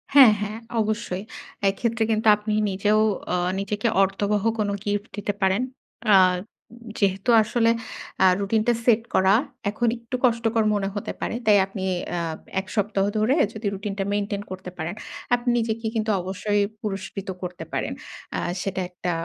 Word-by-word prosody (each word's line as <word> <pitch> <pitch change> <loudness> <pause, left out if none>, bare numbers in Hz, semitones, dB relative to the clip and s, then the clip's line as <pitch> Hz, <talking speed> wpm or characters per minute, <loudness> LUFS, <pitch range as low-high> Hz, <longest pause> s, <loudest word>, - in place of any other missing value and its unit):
হ্যাঁ, 265 -6 +10
হ্যাঁ 210 +1 -3 0.2
অবশ্যই। 210 -3 -2 0.5
এক্ষেত্রে 225 +3 0
কিন্তু 220 +1 +1
আপনি 210 +1 -3 0.2
নিজেও 205 +3 +2 0.3
অ - - +3 0.2
নিজেকে 205 +3 -1 0.2
অর্থবহ 200 +1 0 0.2
কোন 210 -1 +1 0.2
গিফট 205 +1 -1
দিতে 205 0 -2
পারেন। 190 +3 +3 0.5
আ - - +9 0.8
যেহেতু 195 +2 +1
আসলে 230 +2 +2 0.5
আ - - +7
রুটিন 200 +2 +1
টা 240 - +5
সেট 230 -2 +5
করা 190 +1 +5 0.4
এখন 230 +3 -1
একটু 235 +2 -6
কষ্টকর 230 -1 +2
মনে 200 -2 0
হতে 205 - -3
পারে। - - -2
তাই 210 -1 +6
আপনি 195 0 -6 0.3
আ - - 0 0.4
১ 190 - -7
সপ্তাহ 200 -2 +1
ধরে 220 +6 +3 0.2
যদি 215 0 -7
রুটিনটা 200 0 -3
মেইনটেইন 205 0 -1
করতে 185 -1 -6
পারেন 170 +3 -4 0.4
আপনি 245 0 -2
নিজেকে 225 0 -2
কিন্তু 220 0 0
অবশ্যই 205 +3 -1 0.2
পুরস্কৃত 195 -1 -5
করতে 180 0 -5
পারেন। - - -1 0.4
অ্যা - - -1 0.2
সেটা 190 0 -2
একটা 180 0 -3
205 Hz, 155 wpm, -24 LUFS, 195-220 Hz, 0.8 s, হ্যাঁ